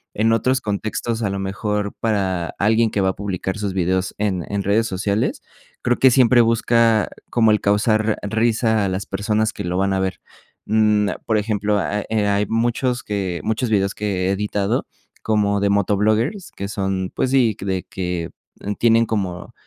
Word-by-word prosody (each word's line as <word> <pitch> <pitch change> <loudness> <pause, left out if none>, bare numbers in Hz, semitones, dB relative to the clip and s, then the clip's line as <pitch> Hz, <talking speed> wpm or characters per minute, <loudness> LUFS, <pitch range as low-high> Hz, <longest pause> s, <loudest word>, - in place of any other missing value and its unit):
en 110 +2 +2
otros 130 +4 +1
contextos, 110 +2 -3
a 105 - 0
lo 100 - -3
mejor 100 +1 -2
para 95 -6 -1
alguien 110 +2 +3
que 105 - -1
va 95 - +2
a - - -1
publicar 95 -1 -3
sus 100 -2 -2
videos 95 0 0
en 95 -4 -1
en 100 -1 -1
redes 110 +4 +2
sociales, 100 +2 -1 0.4
creo 125 - +2
que 130 - +7
siempre 125 -1 +5
busca 115 -1 +3 0.2
como 115 -2 +3
el 105 - +3
causar 110 +1 +2
risa 110 0 +1
a - - 0
las 95 +1 -3
personas 110 +1 0
que - - -6
lo 90 +1 -2
van 95 +1 +1
a 95 - 0
ver, 95 -1 -2 0.5
mm, 105 -1 +2 0.2
por 110 - +2
ejemplo, 105 -1 0
eh, 100 +3 -2 0.2
ah, 100 - +2
hay 105 +1 +1
muchos 120 +3 0
que 95 -4 -3
muchos 110 +2 -1
vídeos 100 -2 +1
que 105 - -5 0.2
he - - +2
editado 100 0 -1 0.3
como 105 -2 +1
de 100 0 +1
motovloggers 105 - +1
que 100 - -6
son, 95 -2 -2
pues 130 - 0
sí, 120 -6 +3
de 95 -1 -2
que 90 -3 -4 0.5
tienen 115 0 +4
como 95 -6 -3
105 Hz, 175 wpm, -21 LUFS, 95-110 Hz, 0.5 s, que